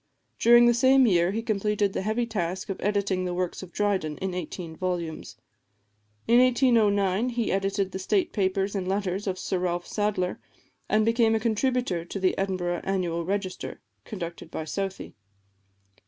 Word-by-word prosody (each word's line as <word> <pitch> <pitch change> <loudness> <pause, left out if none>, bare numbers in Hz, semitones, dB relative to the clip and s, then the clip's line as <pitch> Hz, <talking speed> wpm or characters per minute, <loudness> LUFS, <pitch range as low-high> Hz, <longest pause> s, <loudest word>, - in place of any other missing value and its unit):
During 240 +1 +7
the 240 - +5
same 260 +2 +5
year 175 -5 +3
he 220 +4 -2
completed 210 -2 0
the - - -2
heavy 220 +4 0
task 190 -4 -3
of 195 - -4
editing 200 -2 0
the 180 -1 -2
works 180 -1 -2
of 185 -2 -10
Dryden, 190 -8 -1
in 190 -1 -3
eighteen 170 -1 -6
volumes. 175 -3 -4 0.9
In 235 +1 +6
1809 230 -4 +3
he 235 -2 -1
edited 195 0 0
the 190 - -5
state 360 - 0
papers 195 -1 0
and 190 -3 -3
letters 195 0 -2
of 185 -1 -1
Sir 185 0 -2
Ralph 175 -1 -1
Sadler, 205 -4 -1 0.5
and 215 0 +3
became 230 -1 +3
a - - +1
contributor 230 -5 0
to 175 +3 -6
the 185 -1 +2
Edinburgh 185 -3 -2
Annual 175 -3 -1
Register, 195 0 -3 0.2
conducted 175 -6 -7
by 160 - -5
Southey. 195 +3 -4
195 Hz, 160 wpm, -26 LUFS, 185-220 Hz, 0.9 s, During